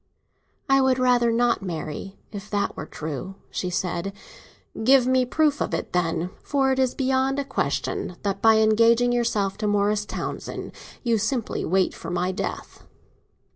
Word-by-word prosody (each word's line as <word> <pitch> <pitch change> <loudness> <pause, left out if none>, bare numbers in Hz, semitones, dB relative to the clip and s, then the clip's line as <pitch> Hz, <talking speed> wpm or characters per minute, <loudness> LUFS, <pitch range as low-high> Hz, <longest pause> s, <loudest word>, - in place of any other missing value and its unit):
"I 270 0 +4
would 260 -1 +3
rather 245 -2 +3
not 235 0 +2
marry, 175 +1 -5
if 205 0 -8
that 205 -1 -1
were 155 - -6
true," 160 +5 -6 0.2
she 180 - -2
said. 180 +1 -2 0.7
"Give 260 +1 +6
me 255 0 +3
a 250 - -1
proof 300 +2 +1
of - - 0
it, - - -5
then; 175 0 0
for 270 -2 +1
it 265 - 0
is 260 -2 +1
beyond 265 0 +1
a 280 - -1
question 265 -8 -2
that 195 -1 -2
by 225 0 +6
engaging 230 +3 +4
yourself 215 -5 0
to 215 - -1
Morris 205 0 +1
Townsend - - -5 0.3
you 230 -3 +2
simply 225 +2 -1
wait 185 +2 +1
for - - -8
my 180 +1 0
death." 190 - -5
220 Hz, 165 wpm, -24 LUFS, 190-255 Hz, 0.7 s, Give